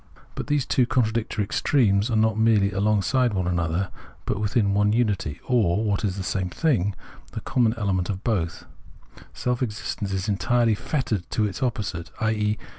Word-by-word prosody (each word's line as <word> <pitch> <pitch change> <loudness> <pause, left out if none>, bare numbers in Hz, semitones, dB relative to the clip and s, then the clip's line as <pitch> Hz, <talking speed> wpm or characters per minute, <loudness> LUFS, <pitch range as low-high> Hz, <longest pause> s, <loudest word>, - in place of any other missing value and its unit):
But - - -5
these 145 -3 +1
two 130 -4 +2
contradictory 115 -4 0
extremes 105 0 +2
are 115 - 0
not 110 0 +3
merely 110 -3 +3
along 100 +1 +1
side 125 +2 +1
one 95 -1 0
another, 85 +1 -1 0.3
but - - -1
within 105 -1 +1
one 105 +1 +3
unity; 100 -10 0
or, 110 -5 +2
what 105 -1 0
is 95 -3 0
the 95 - -4
same 95 -1 -1
thing, 105 - +1 0.4
the - - -4
common 120 -3 +1
element 95 -5 0
of 95 -1 -4
both, 90 -8 -1 0.7
self 125 0 -1
existence, 105 -3 -3
is 95 +1 -2
entirely 115 +3 +2
fettered 110 - -2
to 110 - +1
its 105 +5 -4
opposite, 105 -10 -2
i.e. 105 -1 0
105 Hz, 170 wpm, -24 LUFS, 95-115 Hz, 0.7 s, not